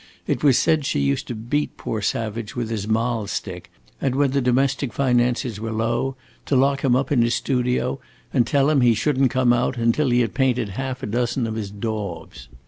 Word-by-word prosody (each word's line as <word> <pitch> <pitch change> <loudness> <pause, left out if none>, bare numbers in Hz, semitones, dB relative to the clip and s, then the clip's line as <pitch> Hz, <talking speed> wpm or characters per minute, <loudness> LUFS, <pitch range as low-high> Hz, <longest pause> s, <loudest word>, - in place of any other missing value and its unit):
It - - -2
was 140 -4 +5
said 160 -2 +2
she 135 - -1
used 70 0 0
to 120 - -4
beat 120 +7 -2
poor 110 - -3
Savage 110 +1 -3
with 120 -2 -3
his 105 -2 -3
mahl 115 -1 0
stick - - -5 0.3
and 130 -2 0
when 140 -1 +2
the 140 0 +1
domestic 130 +1 +1
finances 125 -3 +1
were 115 +1 -4
low 115 +4 -1 0.3
to 140 - +1
lock 140 +1 +2
him 130 -3 +3
up 135 +2 0
in 130 -5 +4
his 120 +1 +2
studio 125 0 0 0.3
and 120 -4 +3
tell 140 +1 +3
him 140 -3 +3
he 120 -2 +4
should 135 +5 0
n't 135 - +5
come 125 0 +3
out 120 +1 0
until 115 +5 +2
he 120 0 +3
had 115 -4 -1
painted 125 -5 +1
half 130 +5 -5
a - - -1
dozen 120 +2 -1
of 110 - -3
his 110 -3 -4
daubs. 100 - -5
125 Hz, 215 wpm, -22 LUFS, 115-135 Hz, 0.3 s, was